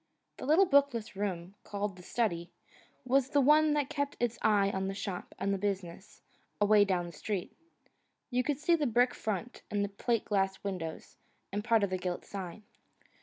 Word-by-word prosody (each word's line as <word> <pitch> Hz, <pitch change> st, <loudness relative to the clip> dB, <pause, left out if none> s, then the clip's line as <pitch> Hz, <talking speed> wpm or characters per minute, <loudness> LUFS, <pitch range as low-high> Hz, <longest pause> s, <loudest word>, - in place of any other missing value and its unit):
The -, -, -6 dB
little 330 Hz, +6 st, +6 dB
bookless 275 Hz, -, +2 dB
room, 190 Hz, -2 st, -3 dB
called 205 Hz, -1 st, -3 dB
the 180 Hz, -, -12 dB
study, 175 Hz, -4 st, -1 dB, 0.6 s
was 265 Hz, +1 st, +2 dB
the 290 Hz, -, +3 dB
one 300 Hz, +2 st, +5 dB
that 290 Hz, -2 st, +1 dB
kept 285 Hz, -1 st, -2 dB
its 240 Hz, -1 st, -1 dB
eye 205 Hz, -2 st, +3 dB
on 190 Hz, 0 st, -2 dB
the 195 Hz, -, -3 dB
shop 190 Hz, -2 st, -5 dB
and 200 Hz, 0 st, 0 dB
the 195 Hz, -, -1 dB
business, 195 Hz, -1 st, -4 dB, 0.4 s
away 205 Hz, 0 st, +5 dB
down 180 Hz, -3 st, 0 dB
the 170 Hz, -, -8 dB
street. 190 Hz, +3 st, -4 dB, 0.8 s
You 250 Hz, 0 st, +2 dB
could 290 Hz, +1 st, 0 dB
see 320 Hz, +4 st, +2 dB
the 305 Hz, -4 st, +2 dB
brick 245 Hz, +1 st, +3 dB
front, 220 Hz, +3 st, -4 dB
and 205 Hz, -1 st, 0 dB
the -, -, -5 dB
plate 230 Hz, +3 st, -1 dB
glass 195 Hz, -2 st, +1 dB
windows, 180 Hz, -5 st, -5 dB, 0.4 s
and 205 Hz, +1 st, -1 dB
part 225 Hz, -2 st, +3 dB
of 200 Hz, -, 0 dB
the 185 Hz, -, -1 dB
gilt 180 Hz, -1 st, -3 dB
sign. 195 Hz, +1 st, -7 dB
205 Hz, 185 wpm, -31 LUFS, 190-245 Hz, 0.8 s, little